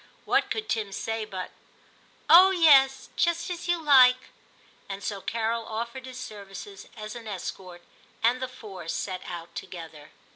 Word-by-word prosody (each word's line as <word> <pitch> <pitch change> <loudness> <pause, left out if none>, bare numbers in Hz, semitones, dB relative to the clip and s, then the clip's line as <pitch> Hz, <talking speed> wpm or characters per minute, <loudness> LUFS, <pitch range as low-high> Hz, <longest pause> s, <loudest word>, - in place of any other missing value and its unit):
What - - +2
could 435 -1 -3
Tim 215 -3 -2
say 225 +2 -3
but, 185 -3 -6 0.4
' - - -32 0.3
Oh 365 +3 +9
yes, 280 -7 +5
just 340 +1 0
as 350 0 -6
you 350 -1 +1
like 255 -4 +5 0.2
' - - -32
} - - -31
And 195 0 -6
so 200 -2 -4
Carol 230 +1 -1
offered 235 +4 -5
his 255 0 -8
services 200 -4 -9
as 215 0 -7
an 230 -2 -9
escort, 185 -2 -7 0.4
and 245 +3 +3
the 260 - -2
four 190 -9 -10
set 185 +2 -3
out 170 -1 -7
together. 160 -4 -9
225 Hz, 170 wpm, -27 LUFS, 195-260 Hz, 0.4 s, Oh